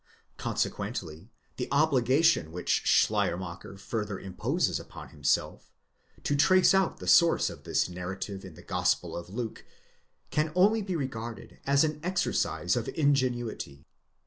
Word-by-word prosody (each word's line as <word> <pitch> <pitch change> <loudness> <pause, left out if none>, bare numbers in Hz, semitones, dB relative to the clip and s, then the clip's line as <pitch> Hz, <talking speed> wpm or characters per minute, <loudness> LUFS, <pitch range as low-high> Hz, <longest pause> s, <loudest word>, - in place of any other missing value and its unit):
Consequently 80 +7 -3 0.3
the 125 - -3
obligation 140 - +3
which 90 +1 0
Schleier 85 - +3
macher 95 +1 -8
further 105 -1 -3
imposes 95 -1 -1
upon - - -11
himself, - - -1 0.5
to 145 - +1
trace 185 +7 +5
out 190 -1 +2
the - - -9
source 170 -1 +5
of - - -13
this - - +1
narrative 95 +2 -6
in 95 -4 -10
the - - -14
Gospel - - 0
of 85 0 -7
Luke, 115 +2 -5 0.7
can 155 +1 0
only 210 +5 +4
be 190 -3 -3
regarded 120 -6 -5
as 140 +1 +4
an 155 -1 -1
exercise 175 - 0
of 120 -2 -2
ingenuity. 120 - 0
120 Hz, 135 wpm, -29 LUFS, 95-155 Hz, 0.7 s, trace